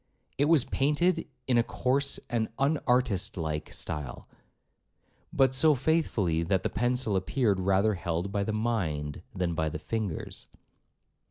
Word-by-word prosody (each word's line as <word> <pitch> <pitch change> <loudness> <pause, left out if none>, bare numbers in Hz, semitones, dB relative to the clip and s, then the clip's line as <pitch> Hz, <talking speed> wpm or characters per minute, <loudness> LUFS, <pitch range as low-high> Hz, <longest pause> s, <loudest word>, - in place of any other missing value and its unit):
It 145 - +4
was 150 -4 +4
painted 150 +6 +1 0.2
in 125 -2 +3
a - - +4
coarse 135 +4 +1
and 115 -2 0
unartist 125 - +1
like 80 -2 -3
style, 75 -4 -5 1.0
but 135 -2 +3
so 150 +3 +4
faithfully, 125 - +1
that 95 +3 0
the - - 0
pencil 120 -2 +1
appeared 100 +1 +1
rather 95 +3 +2
held 85 0 -3
by 100 0 0
the 110 - -2
mind 90 -11 -2
than 90 -2 -1
by 80 -1 0
the 75 - -5
fingers. 105 0 -3
110 Hz, 140 wpm, -28 LUFS, 90-130 Hz, 1.0 s, It